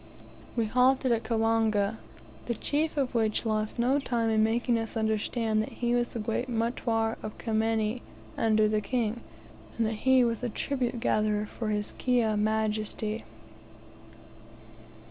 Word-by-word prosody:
We 230 -2 +1
halted 255 +3 +3
at 230 -1 +2
Kawanga, 225 -2 +1 0.5
the 235 - -1
chief 305 +6 -1
of 265 -3 0
which 220 -1 +1
lost 215 -1 -1
no 255 +4 +2
time 235 -4 0
in 215 0 +3
making 235 +1 +1
us 225 +1 -4
understand 220 0 0
that 215 - -5
he 240 0 -1
was 240 0 +1
the - - -4
great 225 +4 -2
Mutware 225 -1 0
of 215 - -7
Kimenyi 225 +1 0 0.3
under 215 -1 +3
the 215 0 +1
king, 230 +1 -1 0.6
and 230 - +2
that 220 -1 -3
he 260 -1 +6
was 230 -2 0
the 245 - -2
tribute 245 +1 -2
gatherer 215 -2 +1
for 220 +1 -5
his 210 -1 -2
Kiha 240 -4 +2
majesty. 215 0 -1
225 Hz, 145 wpm, -28 LUFS, 215-240 Hz, 0.6 s, he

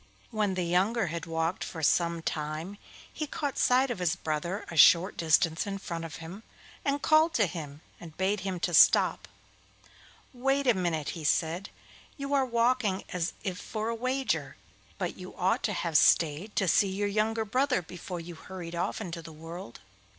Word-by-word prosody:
When 210 -4 0
the 180 - -1
younger 195 +6 +1
had 170 0 -5
walked 165 +2 -1
for 160 -3 -6
some 170 +1 +2
time 155 +7 -4 0.3
he 305 - -4
caught 285 -1 -3
sight 255 +1 +3
of 235 - -4
his 180 -1 +1
brother 170 +4 -3
a - - -6
short 170 +5 +6
distance 165 +2 +2
in 195 -1 -3
front 170 -3 -5
of 155 -4 -8
him, 165 +7 -9 0.4
and 280 +1 -1
called 315 +1 +4
to 215 - +4
him 155 -4 -7 0.2
and 165 -3 -12
bade 195 +2 +1
him 185 -1 -3
to 175 - -1
stop. 155 - +5 1.1
'Wait 270 +3 0
a 245 - +5
minute,' 170 -6 -1
he 165 - -6
said; 165 +5 0 0.5
'you 275 0 -4
are 275 -2 +3
walking 235 -4 +1
as 175 -1 -2
if 185 -2 -3
for 220 0 -4
a - - -1
wager, 255 +3 -1 0.4
but - - -3
you - - -9
ought - - +1
to - - -1
have 170 -2 -3
stayed 165 +7 +3
to 195 - +1
see 195 +4 +4
your 200 +2 -1
younger 220 +2 0
brother 255 -1 +1
before 175 +1 -7
you 170 +1 -8
hurried 175 0 -8
off 170 +5 -2
into 170 -4 -5
the 165 - -11
world. 165 -3 -9
185 Hz, 180 wpm, -29 LUFS, 165-225 Hz, 1.1 s, short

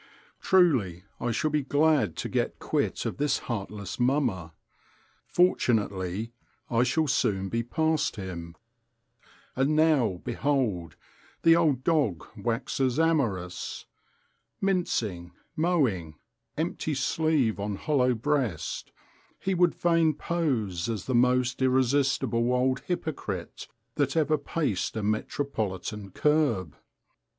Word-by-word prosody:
Truly, 130 - +3 0.2
I 120 - -1
shall 135 +7 0
be 150 0 +1
glad 145 - +2
to - - -3
get - - -1
quit - - -1
of - - -3
this 145 -1 +1
heartless 105 -3 -5
mummer. 120 - +1 0.8
Fortunately 110 - +1 0.4
I 115 0 +3
shall 130 +6 +2
soon 100 -8 0
be 115 +3 0
past 160 +6 0
him. 85 -4 -7 1.0
And 135 +4 +2
now, 145 - +3
behold! 120 - -1 0.5
the 165 0 +7
old 150 -7 +2
dog 140 - +1
waxes 120 +4 -1
amorous. 115 - -1 0.7
Mincing, 110 - -1 0.2
mowing, 130 - +1 0.4
empty 155 -1 -2
sleeve 135 -5 +1
on 100 0 -2
hollow 130 0 +1
breast, 120 - -2 0.5
he 195 - -1
would 175 -1 +3
fain 165 -3 +2
pose 125 - -1
as 110 -5 -3
the 130 - -2
most 125 +1 +2
irresistible 130 -2 +2
old 130 +1 +2
hypocrite 135 - -4 0.3
that 145 +1 +1
ever 155 -1 +2
paced 140 - -2
a 110 - -2
metropolitan 105 -3 -2
kerb. 135 - +1
125 Hz, 110 wpm, -27 LUFS, 100-150 Hz, 1.0 s, the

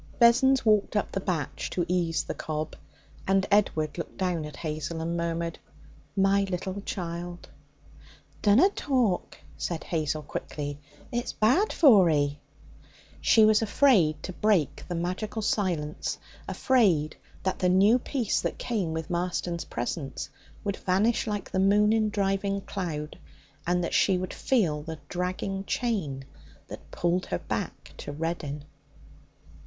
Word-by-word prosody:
Vessons 255 +2 +5
walked 215 -1 +3
up 210 - 0
the - - -1
batch 175 -6 -3
to 175 - -1
ease 170 -2 +1
the - - -4
cob, 155 0 -4 0.5
and 195 0 +3
Edward 160 -7 +2
looked - - -6
down 180 -4 -1
at 150 -1 -8
Hazel 155 +1 -4
and 165 +1 -2
murmured: 170 0 -2 0.6
'My 195 0 +4
little 190 +1 -4
child!' 175 -2 -5 0.9
'Dunna 225 - +6
talk,' 250 - 0 0.2
said 170 -2 -3
Hazel 155 -2 -2
quickly; 145 0 -5 0.3
'it's 240 +1 -2
bad 265 - +3
for 215 - +6
'ee!' 145 -1 +1 0.8
She 220 -2 +6
was 215 0 +5
afraid 205 - +3
to 185 - -5
break 195 -7 +1
the 175 - -3
magical 185 +6 -3
silence, 170 -8 -1 0.3
afraid 185 - +2 0.3
that 190 - -1
the 180 - +2
new 200 +7 +5
peace 245 -3 -1
that - - -2
came 200 -10 -2
with 160 +2 -4
Marston's 175 -1 -2
presence 135 +3 -4 0.3
would 200 -1 -2
vanish 205 +6 +1
like 205 -2 -3
the 190 - 0
moon 205 +2 +4
in 220 -1 +2
driving 195 -1 0
cloud, 160 -7 -5 0.5
and 180 0 +2
that - - -3
she 190 -2 +4
would 185 0 -4
feel 175 - +1
the 160 +1 -6
dragging 185 +2 -2
chain 175 - -2 0.4
that - - -10
pulled 175 +1 0
her 90 - -1
back - - -5
to - - -6
Reddin. 150 -2 -3
180 Hz, 140 wpm, -27 LUFS, 160-210 Hz, 0.9 s, Dunna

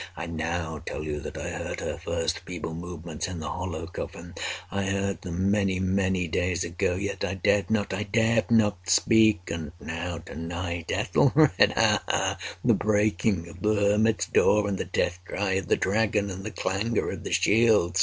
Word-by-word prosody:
I 85 - -4
now 80 -1 -3
tell - - -4
you 75 -1 -3
that - - -7
I - - -4
heard - - -4
her - - -3
first 80 0 -1
feeble 85 -2 -6
movements 85 -2 -5
in 90 -2 -5
the 75 - -4
hollow 85 -2 -4
coffin. 85 0 -7 0.4
I 100 +1 -1
heard 100 0 -1
them—many, 95 +1 0
many 95 -1 +1
days 90 +1 0
ago—yet 90 +3 -2
I 100 - -1
dared 95 +2 +2
not—I 105 -2 0
dared 115 0 +2
not 105 -5 +2
speak! 110 -2 +4
And 80 -2 -5
now—to 85 0 -5
night—Ethelred—ha! 85 +1 +2
ha!—the - - 0
breaking 105 -4 +1
of 85 +1 -12
the 105 0 +2
hermit's 105 +2 +2
door, 105 0 +3
and 100 -2 -2
the - - -2
death 90 -1 -1
cry 95 +2 -2
of 95 0 -1
the - - +3
dragon, 105 0 +1
and 95 +1 -7
the 110 - -4
clangor 105 +3 -1
of - - -7
the - - -5
shield! 105 -6 +3
95 Hz, 165 wpm, -27 LUFS, 85-100 Hz, 0.4 s, speak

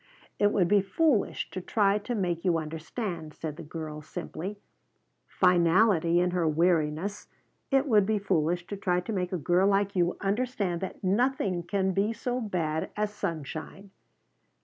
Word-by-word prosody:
"It 205 0 +4
would 185 -5 +2
be 205 +2 +4
foolish 225 +4 +1
to 185 - -5
try 200 +2 +2
to 240 +4 -4
make 175 -5 -1
you 175 -3 +2
understand," 160 +1 -5
said 155 -2 -5
the - - -9
girl 155 -1 -6
simply, 185 +6 -6 0.7
finality 175 -1 +4
in 180 0 +2
her 175 -2 +1
weariness. 165 +4 +1 0.4
"It 270 0 +3
would 210 -6 +4
be 215 -1 +2
foolish 175 -3 0
to 205 - -5
try 180 -2 +1
to 220 - -5
make 180 -2 -2
a 185 - -1
girl 175 +4 +2
like 200 0 +1
you 175 -1 +1
understand 200 -4 -1
that 190 - -6
nothing 200 -2 +1
can 190 +2 0
be 200 +4 +1
so 245 +2 -3
bad 165 -7 -2
as 210 0 -1
sunshine." 165 +3 -5
185 Hz, 160 wpm, -28 LUFS, 170-205 Hz, 0.7 s, It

